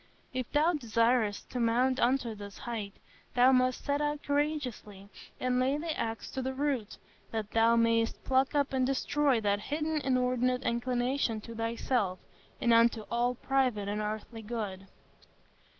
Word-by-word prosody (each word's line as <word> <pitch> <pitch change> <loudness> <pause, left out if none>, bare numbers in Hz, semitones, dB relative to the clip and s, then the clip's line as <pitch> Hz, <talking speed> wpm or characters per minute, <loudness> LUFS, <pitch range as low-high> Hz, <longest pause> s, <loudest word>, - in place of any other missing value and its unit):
If 255 -2 -3
thou 315 +4 +3
desirest 230 -5 +1
to 250 - -3
mount 250 +3 +2
unto 245 -2 +1
this 205 -1 -9
height, 220 -4 -5 0.4
thou 250 +1 +6
must 255 -1 +2
set 285 +1 0
out 295 0 -1
courageously, 280 -9 -2 0.3
and 250 0 +1
lay 265 +3 +2
the 315 0 -3
axe 225 -1 -4
to 265 - -3
the 260 +1 -3
root, 270 -6 -2 0.3
that 220 -2 -4
thou 230 +1 +4
mayest 230 0 +2
pluck 265 +2 +2
up 280 -1 +1
and 260 -1 +2
destroy 275 0 +1
that 205 -1 +1
hidden 305 +6 -2
inordinate 250 -1 +1
inclination 245 0 0
to 230 - -9
thyself, 230 -3 -1 0.4
and 235 - +3
unto 230 0 +4
all 240 +1 +1
private 250 -6 0
and 210 +1 -2
earthly 215 +2 -5
good. 205 -4 -5
245 Hz, 150 wpm, -30 LUFS, 225-265 Hz, 0.4 s, thou